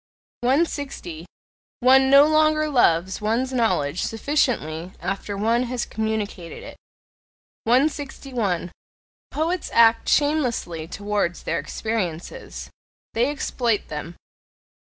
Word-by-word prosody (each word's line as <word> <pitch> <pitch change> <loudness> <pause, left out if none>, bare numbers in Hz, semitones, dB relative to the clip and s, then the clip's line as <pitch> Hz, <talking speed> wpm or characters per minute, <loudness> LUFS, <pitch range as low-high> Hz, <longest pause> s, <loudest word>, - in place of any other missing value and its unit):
160. 260 - -1 0.5
One 265 +1 +6
no 280 +1 +8
longer 310 0 +3
loves 190 - +2
one's 235 +5 0
knowledge 185 - +1
sufficiently 215 - -1
after 195 +3 -4
one 225 +4 +2
has 245 0 -3
communicated 215 -5 -4
it. - - -10 0.9
161. 250 - 0 0.6
Poets 330 +3 -2
act 230 0 +4
shamelessly 250 - 0
towards 205 -2 -2
their - - -1
experiences: 190 -7 -4 0.4
they 240 +4 +2
exploit 245 -6 -1
them. 155 +3 -6
230 Hz, 95 wpm, -23 LUFS, 185-270 Hz, 0.9 s, no